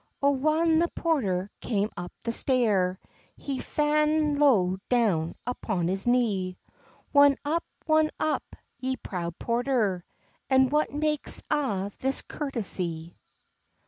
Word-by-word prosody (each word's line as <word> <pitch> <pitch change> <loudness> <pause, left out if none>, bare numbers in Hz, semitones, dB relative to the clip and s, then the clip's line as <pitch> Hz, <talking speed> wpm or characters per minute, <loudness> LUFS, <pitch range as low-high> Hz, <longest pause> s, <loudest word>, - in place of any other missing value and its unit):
O 280 - +5
whan 310 +4 +2
the 340 - +3
porter 205 - 0
came 210 -2 -1
up 175 0 -6
the 230 - -1
stair, 210 -8 +2 0.4
He's 275 -2 -4
fa'n 300 0 +1
low 195 -11 +4
down 200 -10 +1
upon 185 -8 -2
his 195 +4 -2
knee: 205 -7 +1 0.6
"Won 285 -1 +7
up, 330 +3 0 0.2
won 310 -1 +3
up, 310 - -2 0.2
ye 260 +1 -1
proud 170 -7 -5
porter, 235 -7 0 0.5
And 265 -1 +4
what 300 +1 +1
makes 300 0 0
a' 205 -10 0
this 270 +1 -1
courtesy?" 185 - -4
250 Hz, 120 wpm, -27 LUFS, 190-295 Hz, 0.6 s, Won